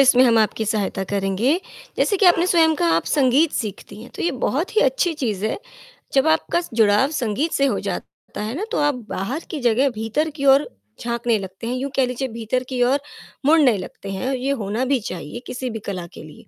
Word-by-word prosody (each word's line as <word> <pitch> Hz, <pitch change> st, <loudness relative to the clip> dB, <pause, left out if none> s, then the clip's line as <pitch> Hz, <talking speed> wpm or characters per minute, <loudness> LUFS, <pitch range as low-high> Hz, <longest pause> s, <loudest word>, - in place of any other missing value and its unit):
इसमें 255 Hz, -2 st, +6 dB
हम 230 Hz, -2 st, +4 dB
आपकी 220 Hz, 0 st, +1 dB
सहायता 205 Hz, -2 st, -1 dB
करेंगे, 200 Hz, -, 0 dB, 0.4 s
जैसे 405 Hz, -, +2 dB
कि 390 Hz, -, +4 dB
आपने 350 Hz, 0 st, +5 dB
स्वयं 325 Hz, -3 st, +4 dB
कहा 170 Hz, -, +1 dB
आप 165 Hz, -, 0 dB
संगीत 285 Hz, +2 st, +3 dB
सीखती 215 Hz, -1 st, -5 dB
हैं, 240 Hz, -, -12 dB
तो -, -, -5 dB
ये 345 Hz, -, +2 dB, 0.2 s
बहुत 330 Hz, -, -2 dB
ही -, -, +6 dB
अच्छी 395 Hz, -9 st, +2 dB
चीज़ 220 Hz, -9 st, -2 dB
है, 220 Hz, -, -2 dB, 0.6 s
जब 270 Hz, +2 st, +3 dB
आपका 320 Hz, +2 st, +2 dB
जुड़ाव 220 Hz, +3 st, +4 dB
संगीत 275 Hz, +3 st, -1 dB
से 275 Hz, -, +2 dB
हो 275 Hz, -, +1 dB
जाता -, -, -6 dB
है 215 Hz, +2 st, -3 dB
ना, 365 Hz, -, -3 dB
तो -, -, 0 dB
आप 290 Hz, -1 st, +2 dB
बाहर 250 Hz, -, -3 dB
की 310 Hz, -, -3 dB
जगह 245 Hz, +3 st, +3 dB
भीतर 225 Hz, +7 st, -1 dB
की 280 Hz, -, -1 dB
ओर 275 Hz, +2 st, +5 dB, 0.3 s
झाँकने 235 Hz, -1 st, 0 dB
लगते 190 Hz, +3 st, -7 dB
हैं, 245 Hz, -, -1 dB
यूँ 270 Hz, +2 st, -3 dB
कह 265 Hz, -, +3 dB
लीजिए 250 Hz, +2 st, -3 dB
भीतर 230 Hz, +2 st, -2 dB
की 255 Hz, -2 st, -2 dB
ओर 265 Hz, +3 st, +3 dB, 0.5 s
मुड़ने 290 Hz, -7 st, +5 dB
लगते 195 Hz, +1 st, -8 dB
हैं, 255 Hz, +8 st, -2 dB
ये 260 Hz, +2 st, -1 dB
होना 210 Hz, +6 st, -1 dB
भी 265 Hz, 0 st, +2 dB
चाहिए 175 Hz, +5 st, -6 dB
किसी 250 Hz, 0 st, -4 dB
भी 225 Hz, -, -5 dB
कला 185 Hz, -3 st, -4 dB
के -, -, -10 dB
लिए, 155 Hz, -1 st, -14 dB
250 Hz, 215 wpm, -21 LUFS, 215-285 Hz, 0.6 s, इसमें